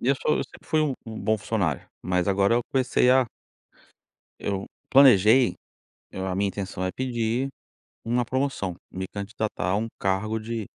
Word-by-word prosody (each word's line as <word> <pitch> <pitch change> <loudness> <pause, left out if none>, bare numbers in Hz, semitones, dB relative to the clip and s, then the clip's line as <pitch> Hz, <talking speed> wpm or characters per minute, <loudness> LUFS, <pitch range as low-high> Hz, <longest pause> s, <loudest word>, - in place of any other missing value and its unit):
E 125 - -1
eu 140 - +5
sou 150 - +1
eu - - -1
sempre - - -17
fui 155 - +3
um 145 -4 +1
um 110 -1 -6
bom 110 0 +1
funcionário, 95 -7 -1 0.2
mas 90 0 0
agora 100 +3 +3
eu 120 - +2
comecei 125 -1 +2
a 130 -1 +5 1.1
eu 100 -1 -3 0.2
planejei, 125 -2 +6 0.6
eu 95 0 -4
a 90 - -2
minha 100 +1 +1
intenção 95 -2 -4
é 95 - -1
pedir 125 0 -1 0.5
uma 120 +1 0
promoção, 130 -8 -1 0.2
me 95 0 -4
candidatar 105 0 -3
a - - +2
um 110 +2 -1
cargo 100 +3 0
de 110 0 -4
110 Hz, 170 wpm, -25 LUFS, 95-125 Hz, 1.1 s, planejei